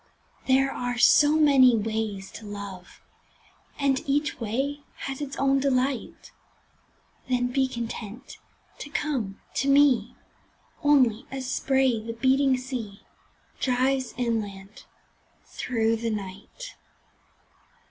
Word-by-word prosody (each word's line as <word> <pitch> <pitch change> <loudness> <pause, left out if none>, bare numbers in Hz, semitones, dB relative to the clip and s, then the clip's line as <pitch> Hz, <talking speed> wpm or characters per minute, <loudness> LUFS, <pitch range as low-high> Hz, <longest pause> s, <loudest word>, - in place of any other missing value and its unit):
There 270 +1 +3
are 245 0 -3
so 295 +4 +6
many 275 -5 +6
ways 215 -2 -3
to 225 - -10
love 200 -3 -9 0.8
And 275 -2 +1
each 290 0 0
way 265 +6 -2 0.3
has 270 +1 -5
its 275 -1 -5
own 275 0 +2
delight 265 -1 -1 1.0
Then 245 -1 +1
be 265 +1 +1
content 235 0 -7 0.4
to 290 - -7
come 260 -10 -2
to 275 - 0
me 275 -2 +4 0.7
Only 255 -6 +3
as 265 0 -5
spray 265 -2 +1
the 230 +1 -6
beating 265 +2 +2
sea 250 -6 -6 0.6
Drives 260 0 0
inland 210 -5 -4 0.6
through 225 -2 -1
the 230 +1 -2
night. 205 - -7
255 Hz, 105 wpm, -26 LUFS, 225-275 Hz, 1.0 s, so